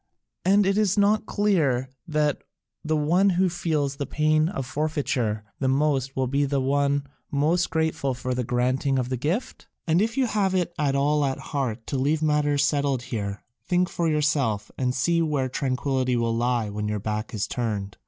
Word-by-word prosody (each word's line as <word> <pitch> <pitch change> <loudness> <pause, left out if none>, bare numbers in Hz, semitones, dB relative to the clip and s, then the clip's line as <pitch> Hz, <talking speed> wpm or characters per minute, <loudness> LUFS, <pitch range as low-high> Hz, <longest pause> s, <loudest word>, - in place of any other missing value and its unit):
And 200 +2 +4
is 195 0 +2
it - - +4
not 210 +1 +3
clear 155 - +1 0.2
that 150 -2 0 0.4
the 155 0 0
one 175 +7 +3
who 185 0 +2
feels 150 -5 -1
the 140 - -3
pain 155 +1 +2
of 135 -9 -4
forfeiture 130 -7 -1 0.2
the 135 - 0
most 135 -1 +1
will 130 - +1
be 140 +3 +1
the 140 0 0
one 140 +1 +1 0.2
most 160 +5 +1
grateful 160 -5 0
for 125 +1 -3
the 125 0 -1
granting 130 +3 0
of 125 -1 -1
the 130 - -1
gift? 165 - -3 0.2
And 170 +2 +3
if 230 +4 -1
you 265 - +3
have 200 -5 0
it 175 -1 0
at 140 -2 +1
all 145 +2 +2
at 135 -1 0 0.2
heart 125 -5 -2
to 135 - -2
leave 150 +4 +1
matters 145 -1 +2
settled 140 -3 0
here, 100 -2 -3 0.2
think 180 0 +1
for 170 -1 -1
yourself, 145 -9 0
and 125 -1 -1
see 170 +7 +2
where 150 -5 0
tranquillity 130 -1 -1
will 115 -1 0
lie 120 -1 0
when 105 +1 -3
your 105 0 -1
back 105 +2 -3
is 105 - -1
turned. 105 -5 -3
140 Hz, 185 wpm, -25 LUFS, 125-160 Hz, 0.4 s, And